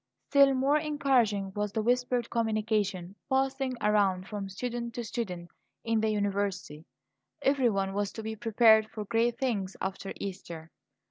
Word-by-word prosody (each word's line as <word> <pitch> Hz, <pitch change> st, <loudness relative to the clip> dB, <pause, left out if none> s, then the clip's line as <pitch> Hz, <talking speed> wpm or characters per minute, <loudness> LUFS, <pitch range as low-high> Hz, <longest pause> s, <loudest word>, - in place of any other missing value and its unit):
Still 275 Hz, -1 st, +6 dB
more 275 Hz, +3 st, +3 dB
encouraging 250 Hz, -10 st, +1 dB
was 205 Hz, 0 st, -2 dB
the 220 Hz, -, -1 dB
whispered 245 Hz, 0 st, 0 dB
communication 215 Hz, -5 st, -1 dB, 0.2 s
passing 265 Hz, -1 st, 0 dB
around 200 Hz, -3 st, +2 dB
from 200 Hz, -2 st, -5 dB
student 235 Hz, +3 st, -4 dB
to 240 Hz, -, -3 dB
student 185 Hz, -7 st, -5 dB, 0.3 s
in 225 Hz, -1 st, +1 dB
the 220 Hz, -, +1 dB
university; 200 Hz, -6 st, -2 dB, 0.6 s
everyone 235 Hz, -9 st, +2 dB
was 205 Hz, 0 st, -1 dB
to 220 Hz, -, -7 dB
be 220 Hz, 0 st, -4 dB
prepared 220 Hz, -1 st, +4 dB
for 215 Hz, -2 st, -6 dB
great 230 Hz, +2 st, +1 dB
things 215 Hz, -8 st, -2 dB
after 190 Hz, +1 st, -4 dB
Easter. 170 Hz, -4 st, -7 dB
220 Hz, 140 wpm, -29 LUFS, 195-245 Hz, 0.6 s, Still